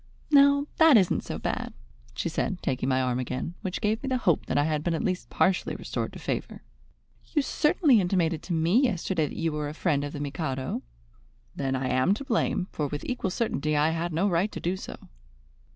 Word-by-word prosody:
"Now 280 0 +6
that 320 -6 +7
isn't 190 -4 +2
so - - -5
bad," - - -3 0.4
she - - -2
said, 180 - -2
taking 130 0 -1
my 130 0 +2
arm 125 -1 0
again, 130 +6 -3
which 185 -2 -4
gave 215 +2 0
me 275 - -5
the 260 - +1
hope 180 - +1
that - - 0
I 145 - +4
had 150 -1 -1
been 170 -1 0
at - - -2
least 185 -1 -2
partially 185 -1 +1
restored - - -4
to - - -8
favour. - - -4 0.7
"You 295 - +3
certainly 300 - +3
intimated 175 -3 0
to 180 - -4
me 170 +9 +3
yesterday 185 - 0
that - - -8
you 165 -1 0
were 150 -1 -3
a 150 - -8
friend 150 -5 +1
of 145 - -5
the 145 - -5
Mikado." 140 -2 -3 0.7
"Then 135 -1 -1
I 130 0 -1
am 130 +10 +3
to 280 - -6
blame; 225 -7 0
for 150 - -2
with 145 +1 -5
equal 245 -6 -2
certainty 155 - -1
I 150 +2 +3
had 165 +1 -2
no 170 +6 +1
right 185 +3 +1
to - - -5
do 175 +2 -1
so." 190 - -7
170 Hz, 215 wpm, -27 LUFS, 145-205 Hz, 0.7 s, that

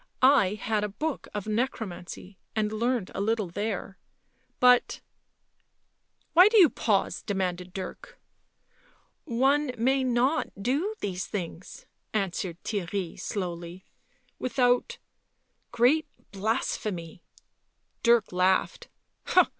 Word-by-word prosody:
I 255 -8 +5
had 215 0 -1
a 210 - -1
book 300 +9 -4
of 205 -2 -4
necromancy 210 -5 -4 0.2
and 215 -1 0
learnt 230 -1 -1
a - - -3
little 215 -2 0
there... 195 +1 -4 0.6
but.. 250 -1 +4 0.4
." - - -48
" - - -45
Why 360 +4 +8
do 445 +1 +3
you 355 -7 +8
pause?" 200 -4 0
demanded 185 -3 -2
Dirk. 185 0 -8 0.6
" - - -35
One 270 +4 +2
may 265 +3 +2
not 255 +5 +1
do 285 - 0
these 185 -2 -3
things," 180 -3 -6 0.3
answered 185 -4 -2
Theirry 195 -3 -3
slowly, 175 -2 -5 0.3
" - - -40
without 245 0 +1 0.4
— - - -47
great 295 +7 +3 0.2
blasphemy 195 -5 -2 0.4
" - - -48
Dirk 235 -2 +4
laughed. 185 +1 +1
215 Hz, 115 wpm, -27 LUFS, 190-250 Hz, 0.6 s, Why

